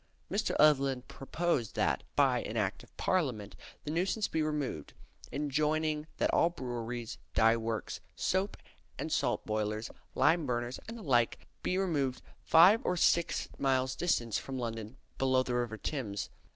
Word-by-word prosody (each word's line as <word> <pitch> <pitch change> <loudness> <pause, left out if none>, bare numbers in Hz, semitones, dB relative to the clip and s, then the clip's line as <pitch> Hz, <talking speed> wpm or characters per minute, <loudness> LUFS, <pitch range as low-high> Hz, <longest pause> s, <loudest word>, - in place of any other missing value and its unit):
Mr. - - 0
Evelyn 135 -4 +4
proposed 140 -2 -2
that, - - +1
by - - +4
an - - -4
Act - - -1
of - - -19
Parliament, 130 - 0 0.3
the 150 - -4
nuisance 190 +6 0
be 160 - -1
removed; 150 - -2 0.4
enjoining 150 +2 0
that - - +1
all 165 - +4
breweries, 120 -5 -5 0.2
dye 115 +1 +5
works, 115 -1 -3 0.2
soap 190 +2 0 0.4
and - - -4
salt - - 0
boilers, 110 +1 -2 0.2
lime 165 -3 +3
burners, 120 0 -2
and 230 +1 -6
the 220 - -9
like, 120 -6 +1
be 185 - 0
removed 145 -9 0 0.2
five 180 +7 +7
or 180 - 0
six 170 0 +2
miles 130 -1 +2
distant 120 -9 0
from 135 +5 -2
London 115 0 -5 0.2
below 130 -1 +3
the 125 - -3
river 120 -2 -1
Thames. 110 -7 -4
135 Hz, 150 wpm, -32 LUFS, 120-160 Hz, 0.4 s, five